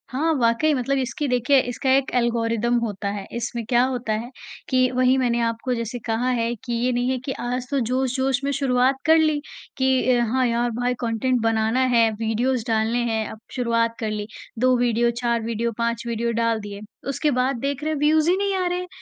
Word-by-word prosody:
हाँ, 310 +6 0
वाक़ई 245 +5 +2
मतलब 275 +1 0
इसकी 265 +3 -2
देखिए, 250 +2 +3
इसका 245 +2 -3
एक 275 -1 -1
एल्गोरिदम 235 -1 +1
होता 210 -3 -3
है, 200 -1 -5
इसमें 235 0 -3
क्या 240 +2 +3
होता 250 -4 -1
है 225 +3 -3 0.4
कि 255 -1 +3
वहीं 255 +1 +3
मैंने 240 -2 +1
आपको 230 +2 -1
जैसे 235 +1 -4
कहा 230 +2 0
है 235 -1 0
कि 240 - -4
ये 240 +2 +1
नहीं 245 +1 0
है 260 - 0
कि 275 - -2
आज 250 +1 -3
तो 280 - 0
जोश-जोश 260 +2 0
में 280 - 0
शुरुआत 265 -1 +2
कर 320 +1 +6
ली, 310 -2 +2 0.4
कि 260 -1 +2
अ, - - +2
हाँ, 255 +3 +1
यार 235 +1 0
भाई 245 +2 -1
कंटेंट 240 +2 0
बनाना 225 +2 +1 0.2
है, 230 -1 +5
वीडियोज़ 225 +3 -1
डालने 225 +1 +1
हैं, 220 -1 -1
अब 220 - -9 0.2
शुरुआत 230 -2 +1
कर 220 - -2
ली। 210 -1 -4 0.3
2 255 +1 +4
वीडियो, 240 -1 +2
4 235 -1 -1
वीडियो, 230 +1 -2
5 235 0 -1
वीडियो 235 0 -1
डाल 230 -1 +1
दिए, 205 0 -8 0.3
उसके 295 +2 0
बाद 260 +2 +1
देख 280 +2 -3
रहे 310 0 0
व्यूज़ 310 +2 +4
ही 360 - +4
नहीं 400 0 0
आ 370 -1 0
रहे 355 0 -1
हैं, 360 - -6
245 Hz, 210 wpm, -23 LUFS, 230-260 Hz, 0.4 s, कर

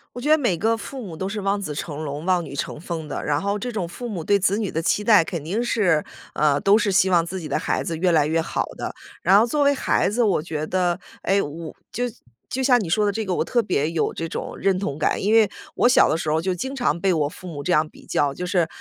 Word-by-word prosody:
我 245 - -6
觉 290 - -1
得 310 - +7
每 240 - +1
个 225 +6 +1
父 265 +3 -7
母 180 -8 -8
都 190 - -3
是 210 +1 -4
望 200 +1 0
子 155 -7 -4
成 150 +1 -5
龙、 145 0 -5
望 180 -1 +1
女 140 - -9
成 145 - -4
凤 165 -2 -5
的。 - - -4
然 145 0 0
后 200 +2 -1
这 245 +4 -4
种 200 -7 -3
父 240 +8 -7
母 190 -8 -4
对 200 +4 +3
子 200 +2 +1
女 210 -4 -1
的 160 - -2
期 205 +5 +1
待 210 -5 +6
肯 165 -2 -5
定 200 +10 -1
是 190 -10 +2 0.3
呃， 145 -2 +3
都 200 +2 +5
是 210 -2 +1
希 190 0 +4
望 170 -2 +3
自 190 +2 -5
己 160 - -6
的 140 - 0
孩 - - -1
子 165 - -3
越 180 +2 +2
来 150 -3 +3
越 160 +2 +1
好 165 - -1
的。 - - -4 0.3
然 190 +3 +6
后 220 - +4
作 290 +4 +1
为 285 0 +4
孩 275 - +1
子 245 - 0
我 200 -8 +2
觉 155 -2 -4
得， 180 -1 0 0.2
哎， 195 +1 +2
我 160 +1 -6 0.2
就 245 - -1 0.4
就 265 - -3
像 250 -2 +4
你 175 - -5
说 210 +6 +2
的 205 - +2
这 220 +2 -3
个， 190 - -1
我 - - +1
特 240 -2 +1
别 155 -7 0
有 165 -1 -1
这 165 - -4
种 - - -5
认 195 -1 +2
同 155 -6 -3
感。 155 - +1
因 210 +3 +2
为 220 -3 +5 0.2
我 245 - +3
小 250 - +6
的 - - +1
时 160 -1 -2
候 155 +1 +2
就 185 +3 -1
经 265 +10 -4
常 245 - 0
被 195 -1 +3
我 155 -4 +1
父 180 +4 -10
母 145 -5 -6
这 180 - -1
样 155 0 +3
比 - - -17
较， 145 -1 +1
就 180 +6 -5
是， 180 -2 +1
185 Hz, 305 characters per minute, -23 LUFS, 160-210 Hz, 0.4 s, 得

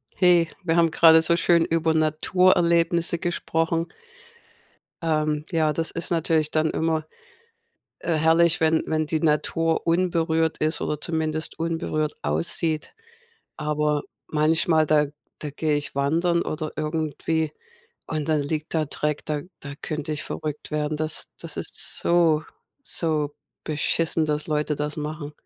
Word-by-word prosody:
Hey, 175 -2 +4 0.2
wir 165 -2 +1
haben 165 -1 +4
gerade 160 0 +6
so 170 +1 +4
schön 170 0 +3
über 165 -1 +1
Naturerlebnisse 170 +1 +2
gesprochen. 165 -1 -1 1.2
Ähm. 155 -2 0
Ja, 160 -3 +2
das 165 +1 -1
ist 170 - -3
natürlich 160 -2 +1
dann 155 0 +1
immer, 160 -1 -1 0.9
äh, 170 - -1
herrlich, 160 +2 +4
wenn 160 0 +2
wenn 155 0 0
die 155 +1 -1
Natur 165 +1 +1
unberührt 165 -2 +1
ist 155 +1 0
oder 150 - -2
zumindest 155 -1 -2
unberührt 160 -2 -1
aussieht. 85 - 0 0.6
Aber, 150 -1 0 0.3
manchmal, 155 +1 +2
da 150 0 +3 0.3
da 150 - -5
gehe 150 +1 0
ich 145 -1 -3
wandern 165 +5 +1
oder 155 0 -4
irgendwie 155 0 -2 0.6
und 155 -2 -3
dann 155 -2 +2
liegt 155 +3 -4
da 160 -1 +2
Dreck, 150 0 -2
da 150 -1 -2 0.2
da 140 0 -7
könnte 155 0 -3
ich 150 - -1
verrückt 150 -1 -5
werden. 150 0 -1
Das 155 0 0
das - - -3
ist - - -1
so, 165 -3 +3 0.4
so 155 - -1 0.3
beschissen, 160 +1 +1
dass 150 0 -1
Leute 150 -1 -1
das 150 0 -2
machen. 150 0 -5
155 Hz, 135 wpm, -24 LUFS, 150-165 Hz, 1.2 s, gerade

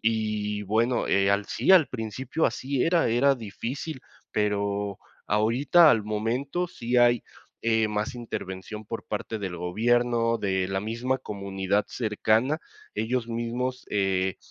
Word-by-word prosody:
y 105 -2 0
bueno, 115 +5 +1
eh, 100 0 +3
al 100 0 0
sí, 190 - +2
al 165 -6 +7
principio 125 +6 -2
así 135 -1 -1
era, 165 -5 +3
era 135 +4 +4
difícil, 130 +6 -5 0.3
pero 100 -1 -1 0.3
ahorita, 125 - +5
al 110 -5 +2
momento, 125 +11 -1
sí 120 -5 -2
hay, 120 -1 +5 0.4
eh, 110 -1 +2
más 105 +2 -2
intervención 105 -3 -6
por 115 +2 -6
parte 110 +1 -4
del 95 -3 -4
gobierno, 115 +5 +1
de 95 -2 0
la 95 0 -1
misma 115 +6 -1
comunidad 100 -1 -2
cercana, 115 +5 +1 0.4
ellos 115 +1 -1
mismos, 120 +2 -3
eh, 95 -2 +1
110 Hz, 130 wpm, -26 LUFS, 105-125 Hz, 0.4 s, al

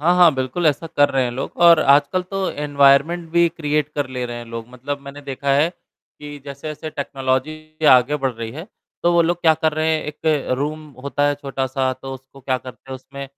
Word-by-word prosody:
हाँ, 170 +4 +3
हाँ, 175 -4 +6
बिल्कुल 130 +6 -1
ऐसा 155 +2 +1
कर 145 -2 +3
रहे 135 -1 +1
हैं 120 - -2
लोग 125 +3 -5
और 170 -2 +8
आजकल 145 +6 +3
तो 195 -1 -1
एनवायरनमेंट 145 +3 +3
भी 170 0 +4
क्रिएट 150 -3 -1
कर 145 -3 -2
ले 125 -1 -4
रहे 120 0 -6
हैं 120 - -7
लोग। 115 0 -7
मतलब 130 +3 -5
मैंने 140 +1 -10
देखा 140 0 -3
है 145 +4 +3
कि 150 -4 -14
जैसे-जैसे 150 +2 -7
टेक्नोलॉजी 150 +3 -3
आगे 130 +3 +5
बढ़ 135 -3 -1
रही 115 -1 -6
है 160 +7 -8 0.4
तो 175 - +3
वो 170 0 +5
लोग 175 +1 0
क्या 160 -2 +5
कर 160 0 0
रहे 155 +1 +1
हैं? - - -4
एक 150 -1 -1
रूम 155 +2 -3 0.2
होता 140 +1 0
है 145 - +1
छोटा-सा 135 -2 -2
तो 130 +1 -8
उसको 135 +1 -15
क्या 130 0 -1
करते 125 +1 -12
हैं - - -4
उसमें 140 +1 -9
145 Hz, 215 wpm, -20 LUFS, 130-155 Hz, 0.4 s, और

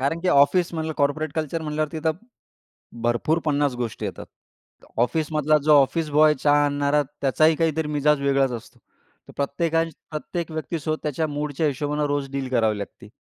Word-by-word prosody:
कारण 150 +5 -1
की 185 - -1
ऑफिस 165 +6 +4
म्हणलं, 160 -1 -2
कॉर्पोरेट 150 +2 0
कल्चर 160 +1 -2
म्हटल्यावर 155 0 -2
तिथ 160 0 -1 1.0
भरपूर 120 +8 +1
50 145 -3 +1
गोष्टी 120 -4 -4
येतात. - - -6 0.7
ऑफिसमधला 155 +4 +2
जो 155 - +6
ऑफिस 155 +3 -1
बॉय 150 +1 +5
चहा 145 0 +4
आणणारा, 145 +1 +1 0.2
त्याचाही 155 +4 +3
काहीतरी 160 -1 0
मिजाज 150 0 +2
वेगळाच 135 -1 +2
असतो. 115 -2 -9 0.5
तर - - -12
प्रत्येकाच्या 165 +3 -1
प्रत्येक 165 +2 -4
व्यक्तीसोबत 155 0 -3
त्याच्या 150 +1 -1
मूडच्या 150 +1 -2
हिशोबानं 145 +2 -1
रोज 145 -1 -2
डील 135 -1 -3
करावी 110 -4 +1
लागते. 100 0 -9
150 Hz, 155 wpm, -23 LUFS, 140-155 Hz, 1.0 s, जो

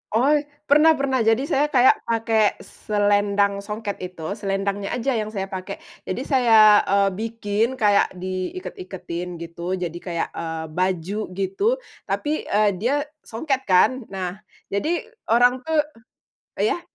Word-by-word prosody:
Oi, 290 +5 +3 0.2
pernah 305 +2 +5
pernah. 275 -2 0
Jadi 225 +3 +3
saya 290 +2 +3
kayak 260 -3 +4
pake 225 0 -1 0.3
selendang 205 -1 +1
songket 210 0 -5
itu, 180 -3 -8 0.2
selendangnya 195 0 -2
aja 250 +3 -1
yang 215 - -2
saya 195 0 -3
pakai. 185 -1 -5 0.3
Jadi - - -2
saya, 225 -6 +6
eee, 200 0 +3
bikin 225 +2 -1
kayak 205 -5 +2
di 185 - -4
iket-iketin 180 - -6
gitu 170 +2 -5
jadi 175 -2 -4
kayak, 170 -2 -2
eee, 160 -1 -5
baju 185 +2 -1 0.2
gitu 195 - -3 0.4
tapi, 300 +1 -2
eee, 210 0 +3
dia 240 +7 +1 0.3
songket 265 +4 -2
kan, 220 +6 +3
nah 190 0 -5 0.3
jadi 310 +13 -1 0.2
orang 245 +3 +4
tuh 315 -2 +3 0.7
iya? 410 -5 +1
205 Hz, 135 wpm, -23 LUFS, 190-255 Hz, 0.7 s, saya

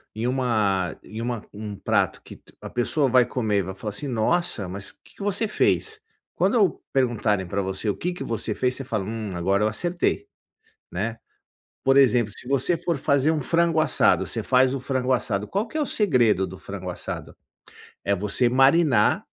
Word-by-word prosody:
em 110 +2 -3
uma 110 -8 0
em 110 +2 -7
uma 120 -2 -3
um 105 0 -6
prato 100 - 0
que - - -13 0.2
a - - -7
pessoa 135 +4 +1
vai 125 0 +5
comer 110 -5 0
e - - +2
vai 95 +1 -6
falar 105 +2 -5
assim: 105 +8 -4
"Nossa 120 - 0
mas 100 +2 -5
que - - -22
que - - -13
você 205 +2 0
fez?" 435 - 0 0.3
Quando 215 -7 +2
perguntarem 110 -7 +1
pra 100 +3 -1
você 95 +2 -4
o 100 - 0
que 180 - -2
que - - -6
você 110 -1 -3
fez, 125 0 0
você 135 - -4
fala: 110 -6 -2
"hum, 110 -1 -4
agora 95 +4 +1
eu - - +3
acertei", 175 - -1 0.6
né. - - -3 0.7
Por 135 0 +4
exemplo 125 -5 +4
se 125 - -10
você 140 +6 +1
for 170 -2 -1
fazer 140 +2 +2
um 155 -2 -1
frango 165 +2 +2
assado, 155 - +3
você - - -3
faz 130 0 +3
o - - -3
frango 130 -1 0
assado, 105 -4 -1
qual 205 +4 -1
que - - -17
é - - +1
o - - +1
segredo 120 - +2
do 95 +1 -9
frango 95 -2 -6
assado? - - -6 0.7
É 100 - +1
você 105 +5 +1
marinar, 135 +4 +4
125 Hz, 190 wpm, -24 LUFS, 105-145 Hz, 0.7 s, vai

